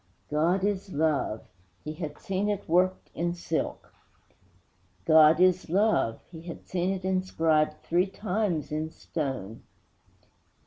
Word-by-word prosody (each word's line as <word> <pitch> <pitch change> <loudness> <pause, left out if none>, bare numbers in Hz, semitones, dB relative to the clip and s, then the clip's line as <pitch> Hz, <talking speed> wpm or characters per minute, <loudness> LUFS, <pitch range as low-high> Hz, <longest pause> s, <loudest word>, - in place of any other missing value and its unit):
'God 170 +6 +2
is 200 -1 -1
love!' 145 -8 0 0.4
he 155 - -5
had 155 -2 -6
seen 195 +2 -2
it 205 -1 -3
worked 185 +3 +1
in 170 +1 -1
silk. 165 -2 -3 1.1
'God 155 +2 +7
is 185 -1 +3
love' 195 - +2
he 160 -2 -9
had 170 0 -9
seen 180 0 -1
it 190 -1 -4
inscribed 165 -5 +1
three 180 +3 +2
times 190 -5 -2
in 155 +1 -2
stone. 135 - -5
170 Hz, 125 wpm, -28 LUFS, 155-185 Hz, 1.1 s, God